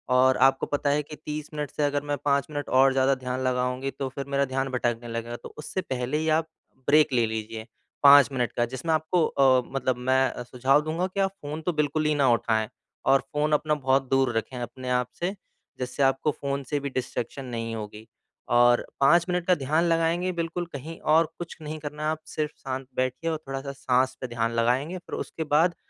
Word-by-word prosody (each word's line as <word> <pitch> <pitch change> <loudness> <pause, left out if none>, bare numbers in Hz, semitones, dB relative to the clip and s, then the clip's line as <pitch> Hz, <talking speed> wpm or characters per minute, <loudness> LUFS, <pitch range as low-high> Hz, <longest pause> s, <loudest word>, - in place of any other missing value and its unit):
और 130 +1 +5
आपको 135 0 0
पता 145 0 -1
है 145 +1 +2
कि 150 +1 -10
30 150 0 -6
मिनट 150 -2 -3
से 150 - -2
अगर 145 0 +1
मैं 145 0 -2
5 140 -1 +2
मिनट 145 -1 -4
और 135 0 +6
ज़्यादा 135 +1 +3
ध्यान 130 0 -4
लगाऊँगी 125 +1 -1
तो 135 - -4
फिर 135 +1 -6
मेरा 140 0 +1
ध्यान 135 0 -2
भटकने 120 -2 -1
लगेगा। 115 0 -4
तो - - -11
उससे 155 +5 -4
पहले 130 -3 -2
ही 160 +1 0
आप 160 - -2 0.4
ब्रेक 150 -1 +5
ले 120 -2 +3
लीजिए, 110 0 -5 0.4
5 140 -1 +9
मिनट 125 -3 -1
का 120 - 0
जिसमें 130 +7 -2
आपको 160 +2 +2
अ, 130 -3 +4
मतलब 130 -2 0
मैं 130 0 +1
सुझाव 130 +4 +2
दूँगा 160 +4 -1
कि 190 +1 -6
आप 195 0 +2
फ़ोन 150 +2 -5
तो 175 +2 -1
बिल्कुल 150 0 0
ही 150 0 +2
ना 140 -2 +3
उठाएँ 110 -2 0 0.4
और 135 0 +5
फ़ोन 150 +1 +1
अपना 150 +1 +2
बहुत 135 -1 +1
दूर 135 -3 +2
रखें 125 +3 -3
अपने 125 +1 -6
आप 125 -1 +1
से। 180 +4 -1 0.4
जिससे 125 +2 -1
आपको 135 +3 +2
फ़ोन 140 0 -3
से 145 - 0
भी 140 0 -4
डिस्ट्रैक्शन 130 0 -4
नहीं 115 -2 -4
होगी 105 0 -8 0.5
और 120 0 +5
5 170 +5 +5
मिनट 180 -1 0
का 180 - +5
ध्यान 155 +3 +1
लगाएँगे 165 +2 +1
बिल्कुल 170 +1 -2
कहीं 155 +4 -7
और 160 +2 +4
कुछ 175 -1 -7
नहीं 155 +1 -5
करना 150 0 -6
है 155 - +1
आप 155 0 -2
सिर्फ़ 155 -1 -2
शांत 130 -1 -5
बैठिए 130 +5 -1
और 160 - -1
थोड़ा-सा 135 +1 -4
साँस 130 -1 +1
पे 130 - -3
ध्यान 115 -1 -1
लगाएँगे 125 +9 +1
फिर 180 - -7
उसके 160 - -4
बाद 160 +3 +3
135 Hz, 210 wpm, -26 LUFS, 125-155 Hz, 0.5 s, 5